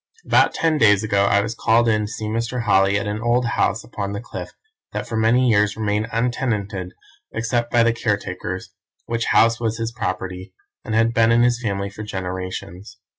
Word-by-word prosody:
"About - - +3
ten 160 -2 +1
days 105 -3 +5
ago 100 -2 +2
I 100 0 +3
was 105 +2 -3
called 115 0 +2
in 110 -2 +1
to - - -9
see 110 - -5
Mr. 115 +3 -2
Holly 100 -2 +3
at 105 - -2
an 105 +1 -3
old 120 +2 +2
house 115 -2 0
upon 100 -3 -5
the 100 - -3
Cliff 120 - -7 0.4
that - - -4
for 115 - -4
many 115 +3 +3
years 105 -2 +2
remained 105 0 -1
untenanted 110 -6 -2 0.4
except 120 +1 -1
by 120 -1 +4
the 115 0 +3
caretakers, 115 - -3 0.3
which 115 0 -2
house 115 +1 +4
was 115 -2 -1
his 115 0 -3
property, 95 -3 -5 0.3
and 110 -4 -3
had 115 +1 +3
been 115 0 +4
in 120 +1 +4
his 120 0 +2
family 100 -3 -2
for 100 - -9
generations. 95 0 -6
110 Hz, 190 wpm, -21 LUFS, 100-115 Hz, 0.4 s, days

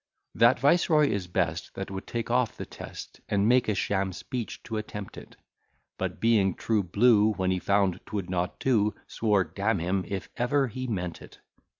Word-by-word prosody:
That - - +5
viceroy 150 +1 +4
is 100 -4 -2
best, 90 -1 -2
That 95 0 -5
would 95 0 -6
take 115 0 -3
off 125 -2 +1
the - - -5
test, - - -10
And 100 0 +2
made 125 -1 +4
a 105 - +1
sham 95 -1 0
speech 120 +4 -6
to 110 -2 -4
attempt 105 -2 -6
it; - - -12 0.6
But - - -3
being 105 -5 +3
true 110 -2 +1
blue, 105 +3 +4
When 95 -2 0
he 95 - 0
found 100 -2 +1
'twould 100 -4 -3
not 90 -1 -2
do, 105 -5 +2
Swore, 105 -4 +1
damn 100 +3 -1
him, 90 +3 -1
if 100 -1 -4
ever 135 +2 +1
he 130 +3 -5
meant 90 -7 -3
it. - - -13
105 Hz, 185 wpm, -27 LUFS, 95-115 Hz, 0.6 s, That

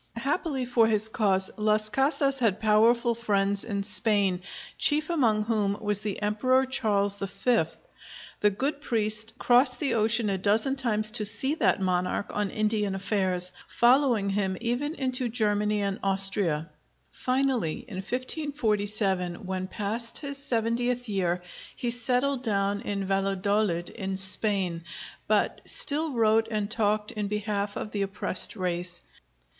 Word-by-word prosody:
Happily 275 +1 -2
for 240 -2 +3
his 220 0 +4
cause, 190 -4 +1
Las 215 0 +1
Casas 275 +2 +2
had 220 -5 +1
powerful 230 +2 +3
friends 200 -3 0
in 200 -3 -3
Spain, 205 -3 +3 0.3
chief 305 +2 +2
among 225 -10 +1
whom 210 -3 -1
was 210 -2 0
the 210 -2 -4
Emperor 255 +6 +1
Charles 205 -6 0
V. 195 +1 0 0.7
The 210 - +3
good 275 +9 -3
priest 215 -4 0
crossed 250 0 +3
the 285 - 0
ocean 225 0 +2
a 190 - -2
dozen 220 +8 +1
times 215 -5 0
to 220 -1 +1
see 265 +7 +4
that 310 - +1
monarch 180 +1 -1
on 210 -1 -1
Indian 210 -2 -1
affairs, 185 -2 -1 0.2
following 240 -4 +2
him 195 -2 -1
even 245 +6 -2
into 255 -3 -2
Germany 210 -2 0
and 200 -1 -3
Austria. 195 -5 +1 0.4
Finally 255 - -1
in 205 -6 -8
1547, 210 - -1
when 185 0 -4
past 220 +4 -3
his 280 -2 -4
seventieth 245 0 -1
year, 180 -3 -1 0.3
he 240 -3 -2
settled 250 +2 0
down 200 -3 -1
in 200 -1 -4
Valladolid, 195 -1 -1
in 190 0 -5
Spain, 190 -3 +2 0.4
but - - 0
still 305 +1 +3
wrote 225 -1 +2
and 210 -2 -3
talked 210 -1 0
in 210 -2 -4
behalf 205 -1 -3
of 210 - -6
the 205 - -3
oppressed 195 +1 +1
race. 180 -2 -3
215 Hz, 140 wpm, -26 LUFS, 195-245 Hz, 0.7 s, his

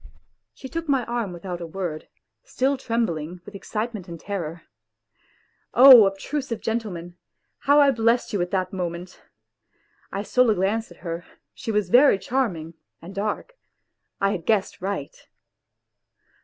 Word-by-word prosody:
She 265 - -9
took 330 +3 -5
my 265 -4 +2
arm 235 -5 -2
without 175 0 -6
a 170 - -5
word, 165 -3 -5 0.4
still 275 - 0
trembling 180 - -2
with - - -11
excite 215 +4 -4
ment 195 -4 -7
and 170 -1 -8
terror. 170 -4 -5 1.1
Oh, 245 -6 +10
pbtrusive 270 -4 -3
gentleman! 180 -7 -4 0.4
How 285 +1 +4
I 285 -1 +6
blessed 230 -1 +1
you 200 - 0
at 175 - -1
that 185 -1 -1
moment! 180 0 -5 0.9
I 200 - -3
stole 250 +2 +3
a 215 - +3
glance 205 +5 0
at 175 -4 -16
her, 170 +1 -4 0.3
she 230 - -5
was 210 -4 0
very 260 -3 +6
charming 190 -8 -2 0.3
and 175 +4 -10
dark 210 - -3 0.7
I 195 0 +2
had 175 -5 -5
guessed 210 -5 +1
right. 190 -7 -4
200 Hz, 145 wpm, -24 LUFS, 175-240 Hz, 1.1 s, Oh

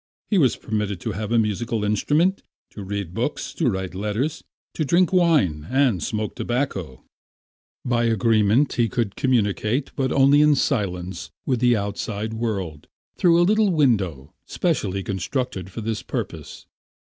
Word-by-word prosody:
He 200 - +4
was 130 -7 +3
permitted 105 -3 -3
to 110 - -3
have 105 +2 -4
a 120 - +3
musical 110 +1 0
instrument, 150 - +1 0.3
to 105 - -9
read 100 -3 -4
books, - - -3
to - - +1
write 95 -1 -3
letters, 105 +11 -2 0.3
to 155 - -1
drink 170 +6 +2
wine 130 - +2
and 130 -9 +2
smoke 105 +5 -2
tobacco. 100 - -3 0.8
By 120 -2 +1
the 115 - +2
agreement 110 +4 +3
he 120 -2 +1
could 115 -5 -2
communicate, 120 - 0
but 130 -1 0
only 140 +2 +5
in 150 -1 +5
silence, 90 - -2 0.2
with 130 -3 0
the 120 0 +4
outside 105 +1 -3
world 100 -9 -3 0.3
through 170 -2 +4
a 175 - +5
little 215 +2 +3
window 100 - +1
specially 95 +1 -1
constructed 95 0 -3
for 115 - -7
this 110 0 -3
purpose. - - -6
110 Hz, 150 wpm, -23 LUFS, 100-135 Hz, 0.8 s, only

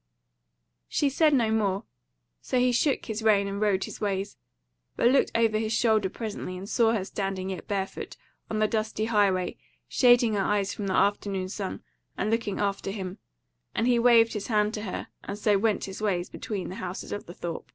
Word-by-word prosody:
She 285 -2 +1
said 310 +2 +4
no 235 -6 +3
more; 205 -2 +1 0.6
so 255 - -1
he 250 0 +4
shook 265 +3 +1
his 220 -1 -4
rein 205 -2 +4
and 200 +1 -4
rode 200 -3 +2
his - - -8
ways; 200 -1 -2 0.6
but 240 - +4
looked 275 - +3
over 225 -2 +3
his 220 0 -1
shoulder 220 -3 +3
presently 205 -4 -5
and 190 +2 -7
saw 230 0 +3
her 200 -4 -1
standing 195 -1 -3
yet 185 - -7
barefoot 195 -1 -4 0.3
on 220 - -2
the 215 0 +3
dusty 215 0 -1
highway 200 -5 +1 0.3
shading 240 - +5
her 200 - +1
eyes 200 0 0
from 205 - -4
the 190 - 0
afternoon 200 -2 +1
sun 195 -1 -5 0.3
and 215 - 0
looking 225 -3 -1
after 200 -1 -1
him, 190 -2 -5 0.6
and 225 - +1
he 245 -1 +4
waved 235 -1 +5
his 210 -2 -4
hand 210 -2 +2
to 210 - -4
her 200 -3 -5
and 200 - -5
so 205 -1 +2
went 215 0 +1
his 195 +1 -6
ways 185 -4 0
between 200 -4 -4
the 185 - -6
houses 180 - -5
of 205 - -5
the 175 - -8
Thorp. 170 -1 -6
210 Hz, 195 wpm, -27 LUFS, 195-225 Hz, 0.6 s, shading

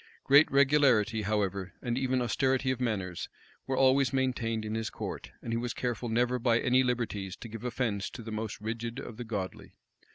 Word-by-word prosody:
Great 140 +3 +6
regularity, 135 -6 +4
however, 100 -2 -1
and 120 -2 -2
even 130 -1 +1
austerity 130 +2 +1
of 130 -1 -3
manners, 95 -7 -2 0.4
were 135 -1 -1
always 135 -1 +4
maintained 120 -4 0
in 110 - -3
his 110 0 -2
court; - - -6
and 115 - -3
he - - +1
was 120 0 -3
careful 120 -1 -2
never 125 +2 +1
by 115 -1 +3
any 125 +1 +3
liberties 110 -6 -2
to - - -9
give 115 0 -8
offence 115 -5 -1
to 120 - -9
the 110 - -7
most 110 -1 -4
rigid 115 +2 -4
of 110 - -8
the 120 - -4
godly. 100 -5 -5
120 Hz, 190 wpm, -30 LUFS, 110-130 Hz, 0.4 s, Great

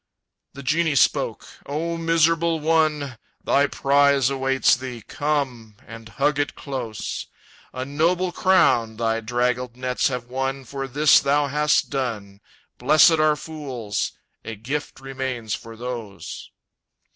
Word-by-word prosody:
The 140 0 -9
genie 155 +2 +1
spoke: - - +1 0.2
"O 165 +4 -2
miserable 165 0 +2
one! 150 -5 +1 0.2
Thy 140 +1 +3
prize 140 -2 +3
awaits 135 -1 +2
thee; 125 -2 -7
come, 130 -7 -2
and 115 0 -11
hug 145 +4 0
it 145 - -1
close! 125 -6 -5 0.4
A 130 0 -5
noble 170 +6 +1
crown 160 -13 +3
thy 115 -1 0
draggled 125 +1 -1
nets 125 0 0
have 125 -3 -3
won 135 +2 -3
For 135 +1 -5
this 145 +3 +5
that - - -8
thou 145 +1 +2
hast 150 +1 +1
done. 105 -7 -4 0.4
Blessed 155 +4 +5
are 155 -1 +4
fools! 135 -10 -4 0.3
A 115 - -6
gift 135 +9 -5
remains 130 -4 -4
for 115 0 -7
those!" 115 -7 -7
135 Hz, 130 wpm, -23 LUFS, 120-150 Hz, 0.4 s, this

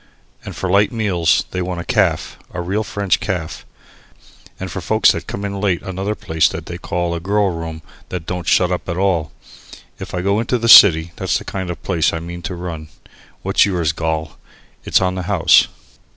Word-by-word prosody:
And - - -8
for 95 - -3
light 100 +3 +3
meals 90 -8 +1
they 90 - -2
want 90 -1 -3
a - - -4
Caff, - - 0
a 90 - -5
real 95 +5 -1
French 100 -2 0
Caff, 90 -6 -4 0.9
and - - -5
for - - -5
folks - - +4
that - - -5
come 100 - -5
in 100 -1 -4
late 95 -5 0
another 95 +3 -3
place 80 -4 +1
that 80 - -7
they 85 +1 -7
call 85 -1 -2
a 85 - -3
Girl 100 +2 +1
Room 80 -1 -6 0.3
that 90 -3 -5
don't 90 -1 -5
shut 90 -1 +3
up 90 - -3
at 85 - -2
all. 90 -6 0 0.7
If - - -7
I 90 - -1
go 100 +3 +1
to 120 +2 0
the 115 0 -2
city 85 -7 +8
that's - - 0
the - - -9
kind 95 -2 -4
of 85 - -6
place 85 -5 +1
I 80 - -2
mean 85 +1 -8
to 90 - -5
run. 85 -3 -6 0.6
What's - - +3
yours, 85 -5 0
Gol? 80 -2 -3 0.5
It's - - +3
on 90 0 +1
the 95 - -4
house?" 95 -5 +5
90 Hz, 205 wpm, -19 LUFS, 85-100 Hz, 0.9 s, city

